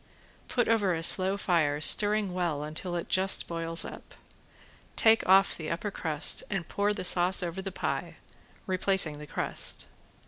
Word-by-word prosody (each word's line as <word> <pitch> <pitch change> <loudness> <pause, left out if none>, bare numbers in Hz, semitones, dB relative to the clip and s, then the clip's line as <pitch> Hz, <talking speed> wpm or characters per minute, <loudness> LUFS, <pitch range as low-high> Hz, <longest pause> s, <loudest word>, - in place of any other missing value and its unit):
Put 240 -2 -1
over 205 -6 +1
a 165 - -5
slow 190 +3 +3
fire, 160 -7 0
stirring 205 +3 +4
well 170 -5 -2
until 155 +4 -5
it 170 - -4
just 190 +1 +1
boils 165 0 -2
up. - - -11 0.8
Take 225 0 +4
off 195 0 +4
the 155 -2 -6
upper 175 +5 -4
crust 155 -5 0
and 195 -5 -4
pour 205 +1 -1
the 205 - -4
sauce 180 +1 +3
over 175 +2 -5
the 195 0 -6
pie, - - -4 0.5
replacing 185 -5 +2
the 150 - -10
crust. - - -5
180 Hz, 160 wpm, -28 LUFS, 165-195 Hz, 0.8 s, stirring